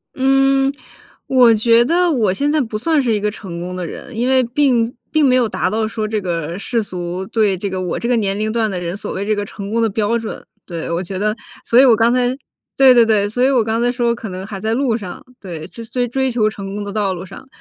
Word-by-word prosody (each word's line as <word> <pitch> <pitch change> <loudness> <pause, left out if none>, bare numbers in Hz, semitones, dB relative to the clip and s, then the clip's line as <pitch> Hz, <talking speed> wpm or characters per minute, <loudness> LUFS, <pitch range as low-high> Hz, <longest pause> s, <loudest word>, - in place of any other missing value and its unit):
嗯， 270 +1 +3 0.5
我 250 -3 +5
觉 230 +2 +4
得 345 +6 +2
我 220 -9 +1
现 285 +8 0
在 305 -1 +2
不 225 -3 -3
算 310 +6 +1
是 245 -4 0
一 210 - +1
个 210 0 -1
成 180 -5 -8
功 180 +1 -5
的 180 -1 -4
人。 255 - -9
因 240 +3 0
为 260 -1 +4
并 240 -2 +1 0.2
并 310 -2 +3
没 255 -1 +4
有 240 -4 +2
达 - - -1
到 220 0 0
说 215 -1 -3
这 215 -1 -2
个 170 -1 -3
世 230 +2 -1
俗 180 0 -5
对 205 -2 +1
这 200 +2 -3
个 185 0 -3
我 180 - -2
这 235 - -3
个 245 - +2
年 200 -3 +1
龄 215 +1 -1
段 225 -1 0
的 185 -2 -3
人 175 +1 -4
所 210 - -6
谓 195 - -3
这 215 0 +1
个 205 - -2
成 200 0 -8
功 230 0 +1
的 225 - +2
标 215 +3 0
准， 225 - -7 0.2
对。 170 -3 -5
我 170 - -1
觉 190 +1 -6
得， 210 +2 0 0.3
所 235 - +4
以 - - +6
我 235 -3 +6
刚 230 +1 +3
才， 250 -1 +2 0.5
对 265 -2 +7
对 240 - +6
对， 210 -2 +2
所 245 +4 -1
以 265 - +4
我 255 -4 +3
刚 225 +1 -1
才 245 0 +2
说 240 -1 0
可 230 -3 -7
能 185 +1 -6
还 200 -2 -7
在 220 +2 -1
路 255 -3 +1
上， 190 -6 -7
对。 170 -5 -7
追 230 - -10
追 245 +1 -2
追 265 +2 0
求 225 -3 +1
成 200 -2 -5
功 205 - -4
的 200 0 -6
道 205 -3 0
路 180 +1 -7
上， 195 +7 -12
220 Hz, 285 characters per minute, -18 LUFS, 195-245 Hz, 0.5 s, 对